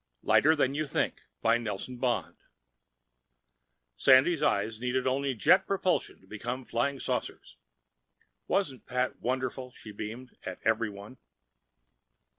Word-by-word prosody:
lighter 160 +3 +5
than 135 -3 +1
you 150 +1 -1
think - - -1 0.2
by 115 +1 +4
NELSON 115 +2 -5
BOND 110 -10 -1 1.6
Sandy's 135 +6 +5
eyes 110 +2 +1
needed 125 +1 0
only 135 0 0
jet 180 - +4
propulsion 190 -2 0
to - - -21
become 120 +6 -5
flying 135 +4 -1
saucers. - - -4 0.9
Wasn't 145 -11 -1
Pat 125 0 -1
wonderful? 130 +1 -2
she 115 -3 -11
beamed, 110 +5 -7
at 95 - -5
everyone. 110 +1 -1
125 Hz, 115 wpm, -29 LUFS, 110-135 Hz, 1.6 s, lighter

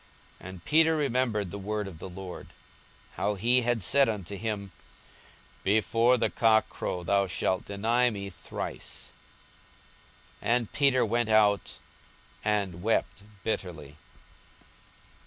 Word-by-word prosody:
And 95 -2 -10
Peter 160 +1 +4
remembered 125 - 0
the 100 - -6
word 105 +1 -3
of 85 -5 -10
the 95 - -7
Lord, 90 0 -8 0.7
how 105 +1 0
he 120 +6 +3
had 120 -3 0
said 140 +6 +4
unto 100 -3 -4
him, 100 -2 -4 0.9
Before 115 +4 +3
the 115 - 0
cock 110 -1 +4
crow, 90 - -4
thou 100 +2 +2
shalt 95 +1 -1
deny 115 +5 +2
me 100 -3 -6
thrice. 85 - -7 1.3
42:022:062 120 - +3
And 120 -4 -5
Peter 135 -4 +3
went 120 +1 0
out, 105 -2 +3 0.7
and 100 -5 -1
wept 110 +1 0 0.2
bitterly. 80 -9 -4
105 Hz, 120 wpm, -28 LUFS, 95-120 Hz, 1.3 s, Peter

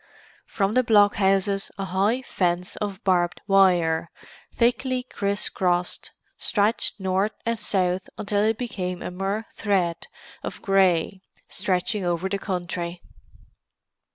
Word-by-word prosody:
From 195 0 0
the 255 +1 +3
blockhouses 200 -3 +3
a 195 - -3
high 200 +7 +1
fence 180 -5 -1
of 205 0 -4
barbed 175 -2 +1
wire, 175 -4 +3 0.4
thickly 250 +2 +1
criss 200 -4 -1
crossed, 180 -2 0 0.3
stretched 210 +1 +1
north 190 +2 0
and 230 -1 -1
south 185 -3 0
until 205 0 0
it 220 +1 +2
became 185 -7 -4
a - - -4
mere 195 +4 -2
thread 185 -5 0 0.3
of - - -6
grey 190 -2 +2 0.3
stretching 195 +2 -1
over 175 +1 0
the 200 +1 -2
country. 175 -2 -4
195 Hz, 120 wpm, -24 LUFS, 180-210 Hz, 0.4 s, the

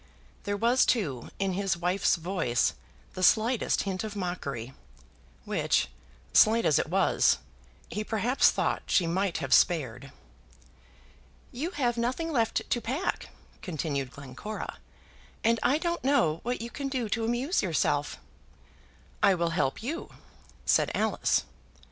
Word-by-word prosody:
There 205 0 -1
was, 235 +4 +4
too, 145 - 0
in 195 -1 0
his 195 -1 0
wife's 180 +3 +2
voice 165 -8 0 0.4
the 185 - -6
slightest 225 +5 +3
hint 190 -1 -3
of 215 -1 -5
mockery, 140 - -4 0.7
which, - - +1 0.4
slight 230 +2 +5
as 150 - +4
it - - -2
was, - - +3 0.5
he 210 +5 -4
perhaps 225 +4 +3
thought - - 0
she 180 - +3
might 185 +2 0
have 135 -4 -1
spared. 135 -6 +2 1.4
"You 285 +8 -3
have 245 -8 -1
nothing 260 +8 -1
left 230 -6 0
to 240 - 0
pack," 270 +12 -2 0.3
continued 145 -6 -3
Glencora, 140 +11 -7 0.6
"and 230 0 +3
I 280 - +3
don't 340 +1 -2
know 255 - +2
what 245 0 -3
you 235 +1 -6
can 280 -1 -4
do 260 -4 -2
to 225 +2 -1
amuse 245 - 0
yourself." - - 0 1.0
"I 200 -2 +5
will 170 -1 0
help 165 +2 -1
you," 310 +8 -4 0.6
said - - +3
Alice. - - +1
205 Hz, 135 wpm, -28 LUFS, 165-240 Hz, 1.4 s, slight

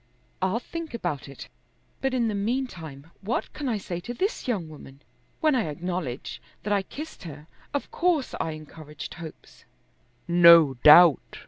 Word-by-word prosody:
"I'll 190 +4 +1
think 330 0 -7
about 160 - -4
it, 140 - -10 0.5
but 270 - 0
in 235 -2 +1
the 215 - -1
meantime 200 - -4
what 215 +5 -3
can 285 -3 -4
I 225 - 0
say 175 -3 -5
to 240 +7 -7
this 390 - -2
young 200 -10 -1
woman? 140 -2 -13 0.4
When 310 -2 +3
I 250 -7 +1
acknowledge 170 -5 -5 0.2
that 205 - 0
I 200 - +2
kissed 300 +11 -9
her, 150 -4 -10 0.3
of 285 - -4
course 335 -6 0
I 160 - -3
encouraged 155 -1 -10
hopes." 160 -2 -12 0.6
"No 170 -4 +7
doubt." 150 +4 +6
180 Hz, 155 wpm, -26 LUFS, 155-245 Hz, 0.6 s, No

